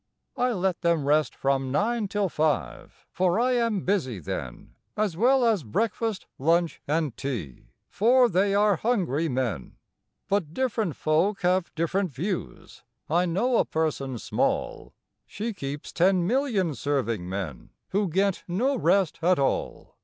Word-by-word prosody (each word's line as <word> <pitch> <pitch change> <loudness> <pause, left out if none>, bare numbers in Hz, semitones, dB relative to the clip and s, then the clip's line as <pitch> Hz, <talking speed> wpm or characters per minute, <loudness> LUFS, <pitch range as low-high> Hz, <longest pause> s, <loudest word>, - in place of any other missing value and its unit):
I 250 -1 +1
let 190 -3 -1
them 170 -4 +1
rest 150 +1 +2
from 135 -1 0
nine 215 - 0
till 205 0 0
five. 155 -3 -2
For 185 +2 +1
I 250 +2 +2
am 230 -5 +1
busy 170 - 0
then, 65 -7 -6 0.2
As 210 -5 0
well 250 +6 +4
as 215 -8 +2
breakfast, 220 - -2
lunch, 165 +3 +1
and 150 -3 0
tea, 115 - -5 0.2
For 245 +5 +4
they 195 0 +2
are 205 -2 +3
hungry 170 - 0
men: 120 - -3 0.5
But 185 -6 -1
different 225 - -1
folk 170 +7 +1
have 180 0 +1
different 180 +4 0
views: 175 - -5 0.3
I 175 +2 +3
know 230 +9 +1
a - - +4
person 140 -5 -2
small - - -2 0.3
She 225 +3 -4
keeps 145 -5 -6
ten 180 0 +3
million 220 - +1
serving 120 -10 -2
men, 95 -9 -5 0.2
Who 200 -1 0
get 195 +3 0
no 240 +11 +1
rest 190 -2 +2
at 180 +2 +3
all! 135 - -2
180 Hz, 145 wpm, -26 LUFS, 145-210 Hz, 0.5 s, well